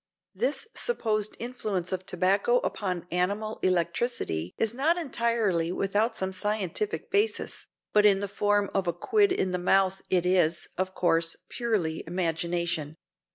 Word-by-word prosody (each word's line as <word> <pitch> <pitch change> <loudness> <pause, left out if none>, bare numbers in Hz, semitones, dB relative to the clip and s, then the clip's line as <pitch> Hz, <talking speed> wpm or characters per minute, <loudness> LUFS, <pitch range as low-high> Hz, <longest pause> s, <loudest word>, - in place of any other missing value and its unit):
This 485 - 0
supposed 215 - 0
influence 215 -7 -3
of 185 0 -4
tobacco 195 +7 +2
upon 180 -4 -2
animal 200 +5 -1
electricity 170 - -1
is 225 0 0
not 305 +7 +2
entirely 230 - 0
without 205 +5 0
some 190 0 -2
scientific 210 - -2
basis, 420 +2 0 0.3
but 210 - +5
in 200 -2 +5
the 200 - -2
form 205 0 +1
of 195 -2 0
a 170 - +1
quid 405 - +2
in 190 - 0
the 180 - -1
mouth 195 +1 +3
it 180 -2 +2
is, 175 -2 +2
of 185 +1 -2
course, 165 -2 +2
purely 210 -10 -1
imagination. 170 -2 -1
195 Hz, 140 wpm, -27 LUFS, 175-220 Hz, 0.3 s, but